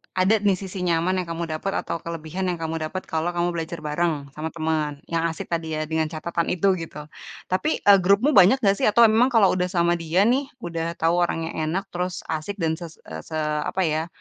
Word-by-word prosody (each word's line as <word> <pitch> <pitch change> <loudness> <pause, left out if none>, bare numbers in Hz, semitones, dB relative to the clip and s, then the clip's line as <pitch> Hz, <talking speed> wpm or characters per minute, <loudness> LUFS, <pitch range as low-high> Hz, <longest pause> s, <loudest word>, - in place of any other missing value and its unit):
ada 190 +4 +3
nih, 200 -2 +2
sisi 190 0 -7
nyaman 175 +2 +1
yang 180 - -4
kamu 165 0 -3
dapet 155 +5 -2
atau 165 - -4
kelebihan 170 +3 -4
yang 180 - 0
kamu 165 -1 -4
dapet 185 +4 -5
kalau 160 +1 0
kamu 175 0 +1
belajar 170 0 -4
bareng 150 -2 -1
sama 155 +3 -5
temen 155 -3 -2
yang 165 0 +1
asik 165 0 -6
tadi, 165 -2 -2
ya, 155 - -1
dengan 160 0 -1
catatan 165 +1 -3
itu, 190 +2 +2
gitu, 155 -2 -7 0.5
tapi, 300 +12 0
eee, 200 -1 +8
grupmu 200 +10 +3
banyak 195 -2 +7
nggak 200 -1 +4
sih? - - +3
Atau 225 +3 +5
emang 225 +3 +5
kalau 225 -7 +4
udah 180 0 0
sama 175 -1 +1
dia 165 +4 +2
nih, 260 +5 +2 0.2
udah 165 0 -3
tau 170 +2 +1
orangnya 165 -2 -1
enak, 175 +6 -2
terus 180 +1 -3
asik 160 +6 -3
dan 160 -4 -1
se 170 - -6 0.2
se 80 - -8 0.3
apa 190 - 0
ya, 160 0 0
170 Hz, 210 wpm, -24 LUFS, 160-190 Hz, 0.5 s, eee